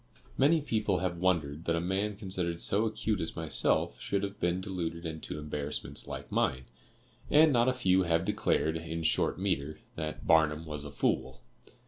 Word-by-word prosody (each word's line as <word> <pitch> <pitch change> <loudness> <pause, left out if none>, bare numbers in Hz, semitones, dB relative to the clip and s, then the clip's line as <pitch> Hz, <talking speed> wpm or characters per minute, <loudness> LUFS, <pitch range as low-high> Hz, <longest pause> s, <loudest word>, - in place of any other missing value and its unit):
"Many 155 +4 +4
people 110 -8 0
have 90 -1 -2
wondered 80 -4 0
that 85 - +1
a - - +1
man 95 +4 -1
considered 95 -4 -2
so 105 +5 +3
acute 110 -2 -1
as 80 - -2
myself 75 -6 0
should 100 0 -1
have 100 0 -4
been 90 +1 +1
deluded 85 -3 -4
into 80 -1 -5
embarrassments 75 -1 -3
like - - -7
mine, 65 0 0 0.6
and 155 0 +6
not 120 +1 +4
a - - +4
few 95 -7 +3
have 85 0 +1
declared, 80 -2 +1
in 80 0 -5
short - - +1
metre, 80 -6 -1 0.2
that 80 -1 -5
'Barnum 80 0 +3
was 75 -2 -4
a - - -6
fool. 65 -2 -1
85 Hz, 170 wpm, -30 LUFS, 80-100 Hz, 0.6 s, and